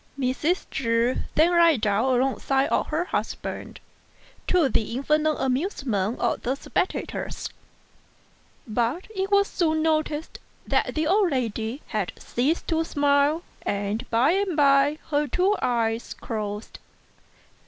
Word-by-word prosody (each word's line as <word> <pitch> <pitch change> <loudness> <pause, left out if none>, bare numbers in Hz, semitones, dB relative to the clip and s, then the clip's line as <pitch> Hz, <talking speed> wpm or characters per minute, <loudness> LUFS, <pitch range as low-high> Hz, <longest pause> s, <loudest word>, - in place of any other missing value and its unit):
Mrs. 280 +7 0
Chu 235 0 +1 0.2
then 325 +3 +5
lay 335 -3 +6
down 210 +1 +1
alongside 265 +2 +1
of - - +1
her 320 +3 -1
husband, - - -4 0.7
to 355 -6 +3
the 230 -2 -1
infinite 305 +3 +1
amusement 255 - -1
of - - 0
the 255 +3 -1
spectators; 355 - -3 1.2
but 240 - -1
it 385 0 -1
was 400 0 +4
soon 315 -3 0
noticed 310 -1 -1 0.3
that - - 0
the 310 0 +1
old 390 +3 +3
lady 235 -1 -2
had 210 -5 -2
ceased 280 +8 -1
to 325 -1 +2
smile, 290 +1 +2 0.2
and 205 +2 -2
by 240 +6 +3
and 380 -3 0
by 280 +1 +4
her 295 0 +2
two 370 +9 +2
eyes 230 -1 -1
closed. 210 -1 -5
280 Hz, 125 wpm, -25 LUFS, 235-320 Hz, 1.2 s, lay